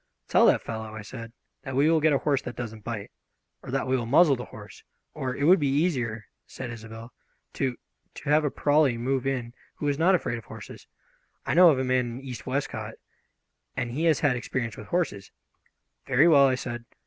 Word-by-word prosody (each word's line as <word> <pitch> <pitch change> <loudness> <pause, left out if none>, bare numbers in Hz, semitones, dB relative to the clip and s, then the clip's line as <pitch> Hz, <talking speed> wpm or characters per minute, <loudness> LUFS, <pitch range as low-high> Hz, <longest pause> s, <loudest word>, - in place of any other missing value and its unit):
"Tell - - +5
that - - +3
fellow," 110 -1 -6
I 110 - -7
said, 115 +2 -9 0.3
"that 130 -1 -6
we 140 +3 +4
will 160 -1 +3
get 155 +1 +4
a 140 - +4
horse 140 -1 0
that 120 - -7
doesn't 110 -3 -7
bite, 110 -3 -5 0.5
or - - -11
that 135 +1 -1
we 130 - +1
will 120 -3 -2
muzzle 145 +3 +5
the 125 -1 -7
horse, 105 -1 -12 0.3
or 130 -1 -3
" - - -9
"It 140 - -2
would 175 +5 +6
be 145 - +1
easier," 125 - 0 0.2
said 125 -2 -7
Isobel, 115 0 -10 0.4
"to 130 -3 -2 0.4
to - - -7
have 155 +1 +4
a 145 - +1
Prawley 145 -3 +2
move 130 +2 -1
in 125 -3 -2 0.2
who - - -5
was 145 0 0
not 185 +3 +5
afraid 120 -8 -2
of 115 - -15
horses. - - -11 0.6
I - - 0
know 175 +2 +8
of 145 - +3
a 130 - 0
man 125 -2 0
in - - -9
East 130 -2 -8
Westcote, 135 +2 -3 0.8
and 120 - -2
he 155 +7 -1
has 160 -4 +3
had 145 -4 +3
experience 120 -1 -3
with 105 - -10
horses 165 - -2 0.4
" - - -50
"Very 135 +5 +5
well," 140 -4 +7
I 130 - +2
said. 120 -2 -5
130 Hz, 220 wpm, -26 LUFS, 120-145 Hz, 0.8 s, know